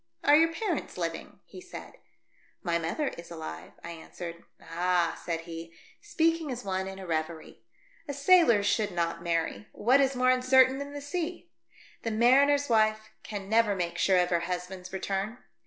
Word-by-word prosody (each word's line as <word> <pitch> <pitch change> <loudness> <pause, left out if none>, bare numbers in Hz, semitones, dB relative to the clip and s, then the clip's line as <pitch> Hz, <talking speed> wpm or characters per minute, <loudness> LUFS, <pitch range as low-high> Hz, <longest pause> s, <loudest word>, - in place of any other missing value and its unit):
" - - -44
Are 290 - +6
your 325 +2 +5
parents 415 +6 -3
living - - -5
?" - - -48
he 370 - -12
said. 370 0 -10 0.7
"My 170 -1 +1
mother 215 - -1
is 170 - -10
alive," 160 - -8
I 170 - -6
answered. 170 +1 -9
" - - -46
Ah 175 +1 0
!" - - -17
said 165 -1 -2
he, 165 0 -9 0.3
speaking 330 -6 0
as 245 0 -5
one 190 0 -2
in 190 0 -7
a 190 - -8
reverie. 160 -1 -4 0.5
"A 285 - -3
sailor 280 - +5
should 210 0 +1
not 170 -1 -2
marry. 170 +4 -2
What 255 +6 +4
is 270 -1 +1
more 255 0 +4
uncertain 260 +1 +4
than 280 0 -6
the 290 - -6
sea? 340 +3 -4 0.5
The 230 - -2
mariner's 275 +6 +4
wife 215 -1 +2
can 205 -2 -6
never 220 -1 +3
make 175 -2 -3
sure 190 -1 +4
of 180 0 +2
her 170 - +3
husband's 180 +1 -5
return. 195 +4 -3
205 Hz, 185 wpm, -29 LUFS, 170-275 Hz, 0.7 s, Are